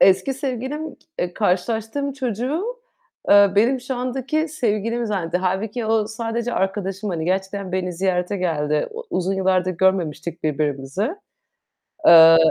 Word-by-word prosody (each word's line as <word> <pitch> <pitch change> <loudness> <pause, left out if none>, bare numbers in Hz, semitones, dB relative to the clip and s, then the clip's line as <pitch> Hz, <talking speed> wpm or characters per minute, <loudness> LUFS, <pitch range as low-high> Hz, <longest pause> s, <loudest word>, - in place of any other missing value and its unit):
eski 190 +8 +4
sevgilim, 270 +4 -4
k - - -30 0.2
eee, 175 0 -2
karşılaştığım 225 +8 -1
çocuğu, 260 - -2 0.7
eee, 200 -1 +7
benim 245 +5 +3
şu 255 +1 -4
andaki 265 +5 -2
sevgilim 235 -4 -1
zannetti. 180 -5 -1
Hâlbuki 205 +5 -2
o, 220 -1 +2
sadece 230 +2 -3
arkadaşım, 195 +1 -2
hani, 160 -2 -3
gerçekten 190 +1 -2
beni 185 -1 -1
ziyarete 180 +2 -1
geldi. 150 -5 0
O 465 +2 -8
uzun 185 +1 0
yıllardır 185 -1 +1
görmemiştik 170 -3 0
birbirimizi. 150 - -1 1.0
Eee 165 -1 +9
200 Hz, 130 wpm, -22 LUFS, 180-240 Hz, 1.0 s, Eee